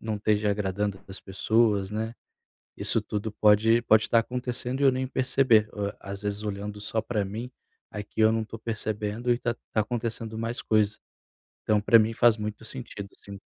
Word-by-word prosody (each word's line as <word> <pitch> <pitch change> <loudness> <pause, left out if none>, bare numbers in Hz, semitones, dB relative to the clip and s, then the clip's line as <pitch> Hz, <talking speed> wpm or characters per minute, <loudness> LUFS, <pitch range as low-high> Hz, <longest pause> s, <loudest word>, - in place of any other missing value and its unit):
não 110 -1 -3
esteja 105 0 +1
agradando 100 -1 -1
para 95 - -18
as 95 - -8
pessoas, 100 0 +1
né. 110 +2 -3 0.6
Isso - - 0
tudo 105 0 -4
pode 110 +2 +4
pode 110 -2 +5
estar 115 - +4
acontecendo 125 +2 -2
e - - +3
eu 135 - +6
nem 130 0 -2
perceber. 130 -5 +3 0.3
Às 100 +1 -7
vezes, 105 +1 -3
olhando 105 0 -4
só 110 +1 -1
para 110 -2 -1
mim, 115 +6 -6 0.4
aqui, 105 +1 -7
eu 110 0 +6
não 115 - 0
estou 110 +1 -9
percebendo 110 +1 -2
e - - -1
tá 120 - -1 0.2
tá 110 - +2
acontecendo 115 -1 -4
mais 115 +2 -3
coisa. 105 -1 +2 0.7
Então, 105 -1 +2
para 115 +2 +6
mim, 110 +1 +1
faz 115 0 +5
muito 105 +1 -5
sentido, 115 -5 -8
sim. 100 0 -10
110 Hz, 180 wpm, -27 LUFS, 105-115 Hz, 0.7 s, eu